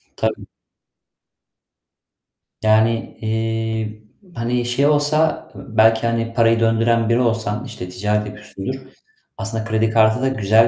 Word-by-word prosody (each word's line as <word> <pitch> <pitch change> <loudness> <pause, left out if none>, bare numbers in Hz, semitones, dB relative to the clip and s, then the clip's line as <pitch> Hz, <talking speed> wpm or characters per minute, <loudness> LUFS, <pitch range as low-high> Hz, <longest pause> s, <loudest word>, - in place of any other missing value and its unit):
Tabii. - - -2 2.2
Yani, 110 +1 +2
eee, 110 -1 -2 0.3
hani, 120 +1 -1
şey 125 +4 +1
olsa 150 +1 +1
belki, 110 +1 +2
hani, 115 0 -1
parayı 115 -1 +3
döndüren 115 0 +2
biri 115 - +3
olsan, 115 0 -1
işte, 110 -7 -8
ticaret 105 +3 -1
yapıyorsundur. 105 +3 -7 0.6
Aslında 110 0 -4
kredi 110 0 +1
kartı 110 +2 +3
da 135 - +2
güzel 110 -1 +4
115 Hz, 110 wpm, -20 LUFS, 110-115 Hz, 2.2 s, güzel